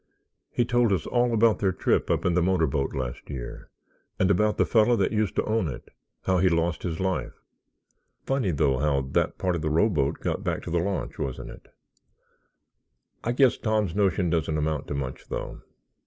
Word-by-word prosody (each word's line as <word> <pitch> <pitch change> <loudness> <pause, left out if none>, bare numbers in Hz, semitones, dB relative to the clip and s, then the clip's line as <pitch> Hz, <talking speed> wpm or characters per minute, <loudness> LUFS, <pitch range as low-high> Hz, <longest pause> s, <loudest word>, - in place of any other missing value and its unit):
He 120 - 0
told 120 -2 +2
us 95 -5 0
all 120 0 +1
about 115 -1 +3
their 95 -2 +2
trip - - 0
up - - 0
in 90 - +2
the 90 - +2
motor 90 -2 +2
boat 70 -1 -1
last 65 -2 -5
year 65 -4 -7 0.5
and 95 +1 +3
about 105 +3 +2
the - - +3
fellow 115 +1 +4
that - - +1
used 105 -3 0
to - - +1
own 110 -5 0
it—how 90 +6 -4
he 95 +1 +4
lost 85 0 0
his 85 -3 -3
life. 95 -1 -1 0.9
Funny 135 -7 0
though, 70 -5 +1
how 70 -2 +1
that 65 +1 -1
part 90 -2 0
of 85 - -3
the 75 - -1
rowboat 80 -3 +1
got - - -2
back - - -2
to - - -6
the 85 - +2
launch, 95 +3 -3
wasn't 65 -2 -4
it? - - -14 1.6
I 120 - 0
guess 130 0 +3
Tom's 110 -5 0
notion 95 -3 +1
doesn't 80 -2 0
amount 75 -1 -1
to 70 - -3
much, 65 -2 -5
though. - - -5
90 Hz, 190 wpm, -26 LUFS, 75-105 Hz, 1.6 s, fellow